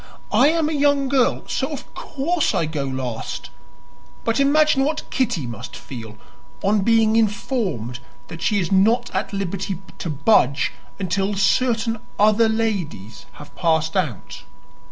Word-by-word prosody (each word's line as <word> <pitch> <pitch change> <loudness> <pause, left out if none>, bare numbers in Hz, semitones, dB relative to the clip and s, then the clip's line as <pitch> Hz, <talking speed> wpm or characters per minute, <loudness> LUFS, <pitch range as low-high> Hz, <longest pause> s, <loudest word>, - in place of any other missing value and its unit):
"I - - +5
am 320 0 +2
a 315 - -1
young 285 -2 +2
girl, 260 -2 +2
so - - -2
of - - -8
course 320 +4 -1
I 165 - +1
go 150 -3 -3
last; 130 -4 -5 0.7
but 230 +2 0
imagine 285 0 +4
what 305 +3 -2
Kitty 235 - 0
must 120 0 -7
feel 110 -4 -9 0.5
on 205 +2 +3
being 225 +1 +3
informed 205 - -1 0.3
that 165 - -9
she 210 - +2
is 180 0 -2
not 225 +6 +3
at 190 +3 -2
liberty 195 -1 -3 0.2
to 170 - -4
budge 140 - +3 0.3
until 195 +2 -1
certain 225 +3 +1 0.2
other 215 +2 +4
ladies 160 - -3
have 145 - -13
passed 160 -1 +1
out." 150 - -2
200 Hz, 140 wpm, -22 LUFS, 155-240 Hz, 0.7 s, I